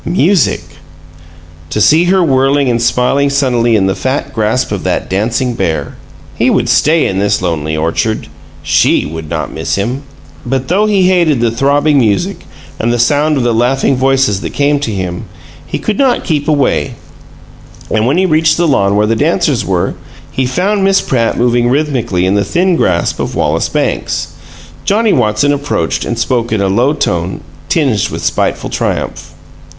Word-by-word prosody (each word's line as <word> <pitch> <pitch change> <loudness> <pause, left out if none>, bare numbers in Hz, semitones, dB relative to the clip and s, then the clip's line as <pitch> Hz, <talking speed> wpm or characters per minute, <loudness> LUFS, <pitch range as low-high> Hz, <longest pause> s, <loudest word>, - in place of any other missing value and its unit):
Music! 180 0 +1 1.1
To - - -2
see 155 +10 +4
her 185 +1 +3
whirling 135 -1 +2
and 115 -1 0
smiling 130 +4 +1
sunnily 125 -4 +1
in 100 -3 +2
the 95 - +1
fat 135 +5 -3
grasp 110 +1 0
of 100 -3 -3
that 90 0 -2
dancing 120 +6 0
bear! 80 -9 -2 0.4
He - - +1
would - - +1
stay 160 +2 +3
in 95 - -1
this 100 +1 +1
lonely 80 -3 -2
orchard; 85 +8 -1 0.4
SHE - - +2
would 80 +1 -7
not - - -4
miss 80 +1 -2
him. 120 +7 -2 0.4
But 130 +1 -3
though 205 +5 +2
he 200 -3 +2
hated 175 -7 +2
the 115 -1 +1
throbbing 145 +4 +2
music 105 -6 -1 0.3
and 115 +1 0
the 120 - 0
sound 145 +5 +2
of 130 - 0
the 120 -1 +1
laughing 130 +4 +1
voices 130 -6 +1
that - - -6
came 145 0 +2
to 140 - -3
him, 90 -3 -4 0.4
he - - -3
could 215 -2 -3
not 265 -3 +2
keep 150 -5 -1
away 140 -4 0 1.0
and 110 +1 +1
when 140 +6 +1
he 190 - +3
reached 155 -2 +2
the 170 0 +1
lawn 100 -8 +2
where 105 +1 +2
the 115 +2 +1
dancers - - +1
were, - - -1 0.4
he 130 -1 -1
found 195 +9 0
Miss 195 0 +3
Pratt 115 -3 -1
moving 120 0 +2
rhythmically 125 -10 0
in 95 - +1
the 100 0 +2
thin 175 - +1
grasp 90 - 0
of - - -3
Wallace - - 0
Banks. - - -2 0.5
Johnnie 215 +1 +2
Watson 125 +4 +1
approached, 145 0 -2
and 120 - -3
spoke 120 0 -1
in 110 - 0
a 100 - +1
low 120 +9 +2
tone, 90 - -2 0.3
tinged 130 - +1
with - - -5
spiteful - - -1
triumph. - - -3
125 Hz, 175 wpm, -13 LUFS, 105-145 Hz, 1.1 s, see